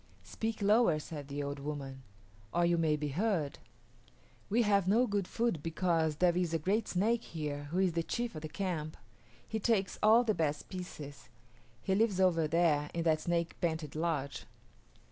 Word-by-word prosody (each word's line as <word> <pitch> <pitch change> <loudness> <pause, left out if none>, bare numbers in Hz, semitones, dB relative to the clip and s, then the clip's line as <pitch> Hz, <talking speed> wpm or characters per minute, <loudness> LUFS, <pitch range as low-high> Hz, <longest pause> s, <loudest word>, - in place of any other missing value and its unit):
"Speak 220 -1 -4
lower," 210 -5 +4
said 150 -2 -7
the 145 +1 -4
old 140 0 -4
woman, 140 -2 -5 0.5
"or 175 0 +2
you 170 0 +3
may 160 -2 +2
be 150 0 -3
heard. 170 -2 -1 0.9
We 235 +4 +3
have 200 -3 +2
no 225 +6 +4
good 200 -4 -1
food 230 -9 -1
because 165 -1 0
there 175 +2 +3
is 175 -2 0
a - - +4
great 195 +8 0
snake 220 +6 +1
here 150 -3 -5
who 160 +5 -4
is 185 -2 +2
the 170 - +1
chief 235 +7 -3
of 155 - -7
the 155 - -6
camp. 165 -3 -3 0.5
He 220 - -2
takes 205 -4 0
all 225 +3 +6
the 220 -3 +1
best 150 -5 -2
pieces. 155 -6 -8 0.5
He 190 - +1
lives 205 -1 +2
over 170 -4 +3
there 150 -2 +2
in 170 - 0
that 160 -2 +2
snake 170 -1 -1
painted 160 -3 -2
lodge." 155 -4 -2
170 Hz, 180 wpm, -32 LUFS, 150-200 Hz, 0.9 s, all